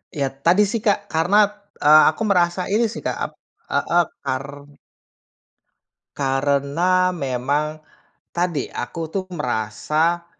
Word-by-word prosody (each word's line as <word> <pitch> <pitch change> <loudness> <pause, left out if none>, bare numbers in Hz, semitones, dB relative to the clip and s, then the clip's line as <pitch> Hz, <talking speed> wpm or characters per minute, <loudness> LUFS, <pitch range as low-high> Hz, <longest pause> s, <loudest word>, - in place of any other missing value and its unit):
Iya 140 -2 0 0.2
tadi 185 +5 +5
sih 230 - -1
Kak, 205 - +4 0.2
karena, 175 +6 +2 0.5
eee, 155 +1 +8
aku 155 - -13
merasa 175 -1 +2
ini 230 +2 +3
sih - - -7
Kak, - - -1
ap - - -8 0.4
heeh, 175 0 +2 0.2
kar 130 +1 -2 1.7
karena 145 +7 +1
memang, 145 0 -2 0.5
tadi 175 -5 -1
aku 160 +7 -4
tuh 190 -1 -2
merasa, 155 - -1
160 Hz, 115 wpm, -21 LUFS, 140-180 Hz, 1.7 s, eee